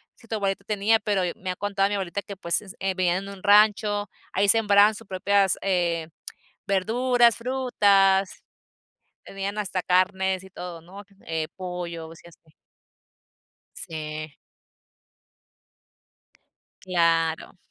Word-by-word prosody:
si 230 - -20
tu 220 - -3
abuelita 200 -1 -2
tenía, 215 +1 +2
pero 205 -3 0
e 175 - -2
me 185 -1 -5
ha - - -5
contado 200 0 0
mi 205 - -1
abuelita 195 0 -3
que, 200 - -9
pues, 170 -3 -1 0.2
eh, 190 0 -1
vivían 185 +1 0
en 200 - -8
un 195 -2 -11
rancho, 205 -1 +4 0.2
ahí 200 +2 +2
sembraban 210 -1 +5
sus - - -12
propias 195 0 +1
eh, 170 -4 0 0.6
verduras, 235 +4 +2
frutas. 200 -7 +2 0.8
Tenían 195 +1 -5
hasta 190 -3 -2
carnes 185 +1 +1
y - - -13
todo, 180 -2 -8
¿no? 195 +4 -12 0.2
Eh, 160 -1 -2
pollo, 175 -3 -6
o 165 - -12
sea, 170 +1 -16
sí. 160 -1 -25 1.2
Sí. 155 -1 -6 2.5
Claro. 165 -2 0
195 Hz, 130 wpm, -25 LUFS, 175-205 Hz, 2.5 s, sembraban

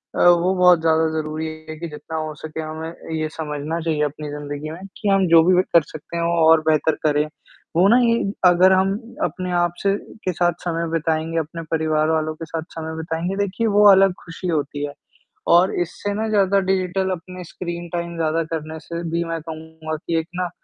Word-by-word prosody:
अ, - - -2
वो 175 +1 +4
बहुत 180 -1 +6
ज़्यादा 160 0 +3
ज़रूरी 155 +1 -4 0.2
है 155 - -5
कि 170 - -4
जितना 160 +2 -7
हो 155 -1 -3
सके 155 +1 -6
हमें 160 +1 -5 0.3
ये 155 0 -1
समझना 155 +1 -4
चाहिए 160 -2 -1
अपनी 150 +1 -4
ज़िंदगी 145 +1 -6
में 170 - -9 0.2
कि 210 - -1
हम 195 -1 +3
जो 165 -1 +7
भी 180 +1 +4
कर 170 - +7
सकते 155 +2 -8
हैं 170 - 0
वो 170 0 +1 0.2
और 160 -1 +6
बेहतर 155 0 +3
करें, 150 0 +3 0.5
वो 180 +4 +5
ना 235 +4 +6
ये 230 -1 +3 0.3
अगर 180 +2 +5
हम 190 +1 +3 0.3
अपने 185 -1 -2
आप 175 0 +1
से 195 0 +3 0.3
के 185 - +1
साथ 175 +1 +2
समय 170 -1 -1
बिताएँगे, 165 0 -1
अपने 165 +2 -5
परिवार 155 -1 +1
वालों 155 -1 0
के 165 - -7
साथ 160 0 -4
समय 160 0 -5
बिताएँगे, 165 +3 -3
देखिए 200 +4 -1
वो 210 0 +4
अलग 195 -1 +5
ख़ुशी 170 +2 -6
होती 145 -3 -1
है 145 - -7 0.6
और 180 +2 +4
इससे 185 +4 -3
ना 220 +2 -2
ज़्यादा 200 -2 +3
डिजिटल 190 0 0
अपनी 185 +1 -6
स्क्रीन 175 0 -6
टाइम 170 0 -3
ज़्यादा 165 0 +1
करने 160 0 -4
से 170 +1 -6
भी 170 +1 0
मैं 165 -1 -3
कहूँगा 160 0 -7
कि 165 -1 +1
एक 160 - -5
ना 180 0 -1
165 Hz, 205 wpm, -21 LUFS, 155-180 Hz, 0.6 s, जो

